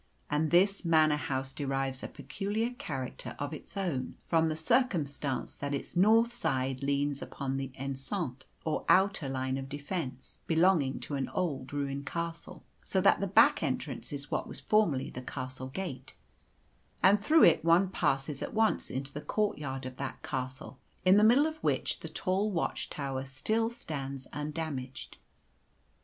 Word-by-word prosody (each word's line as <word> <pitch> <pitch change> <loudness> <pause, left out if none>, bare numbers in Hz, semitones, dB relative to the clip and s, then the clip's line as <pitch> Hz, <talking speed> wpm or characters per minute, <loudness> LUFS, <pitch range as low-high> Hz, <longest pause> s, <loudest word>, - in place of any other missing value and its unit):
And 150 +1 +2
this 195 +4 +4
Manor 155 -3 +4
House 135 -2 -2
derives 135 -1 -2
a - - -4
peculiar 215 +4 -3
character 135 - -5
of 145 +1 -4
its 155 - -8
own 170 -10 -2
from 165 -1 +2
the 155 - -1
circumstance 155 - +1
that 145 0 -3
its 140 - -5
north 225 +6 +5
side 135 - -1
leans 140 0 0
upon 135 -1 -3
the 135 -1 -3
enceinte, 135 +1 -3 0.2
or 155 - -1
outer 190 -7 +4
line 130 0 -1
of 135 0 -7
defence 145 -2 -5
belonging 160 -5 +3
to - - -5
an 135 -1 -1
old 145 -9 -2
ruined 140 0 -3
castle, 170 +1 -4 0.2
so - - 0
that - - +5
the - - 0
back - - +5
entrance - - -3
is 145 0 -5
what - - -1
was - - -6
formerly 170 -12 +2
the 125 - -6
castle 130 0 -5
gate, 135 -3 -6 0.9
and 200 +2 +6
through 315 +6 +6
it 165 - +6
one 170 +3 +5
passes 140 -5 0
at - - -4
once 220 0 +2
into 135 +1 -4
the 150 - -5
courtyard 145 -10 -2
of 130 0 -7
that 135 -1 -5
castle, 130 +1 -5 0.3
in 185 +2 +7
the 210 - +6
middle 245 +7 +6
of 315 0 -2
which - - 0
the - - -7
tall 195 +3 0
watch 175 -5 -2
tower 135 -2 -3
still 215 +13 0
stands 140 - -6
undamaged. 150 -3 -5
145 Hz, 160 wpm, -31 LUFS, 135-185 Hz, 0.9 s, in